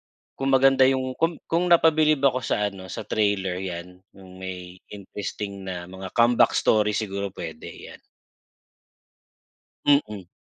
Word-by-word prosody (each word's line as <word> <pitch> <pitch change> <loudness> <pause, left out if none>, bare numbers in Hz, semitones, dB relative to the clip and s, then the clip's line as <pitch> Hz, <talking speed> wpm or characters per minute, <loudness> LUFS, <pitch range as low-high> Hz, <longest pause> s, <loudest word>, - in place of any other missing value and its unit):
ah, - - -
kung 135 - -3
maganda 135 0 +5
yung 130 -1 0
kung 165 0 +1
kung 175 +2 0
napabilib 155 -3 +4
ako 130 -2 +3
sa 105 -4 -1
ano, 95 -1 -10
sa - - -6
trailer 100 -4 0
'yan, 90 -1 -7 0.2
yung 95 -1 -14
may 90 -1 -8
interesting 100 0 -7
na 90 -1 -5
mga 95 +2 -8
comeback 120 0 +4
story 105 -1 +2
siguro, 100 -2 -3
pwede. 240 - -8
'Yan. - - -12 1.9
Mm. 105 -10 +1
105 Hz, 140 wpm, -24 LUFS, 95-135 Hz, 1.9 s, maganda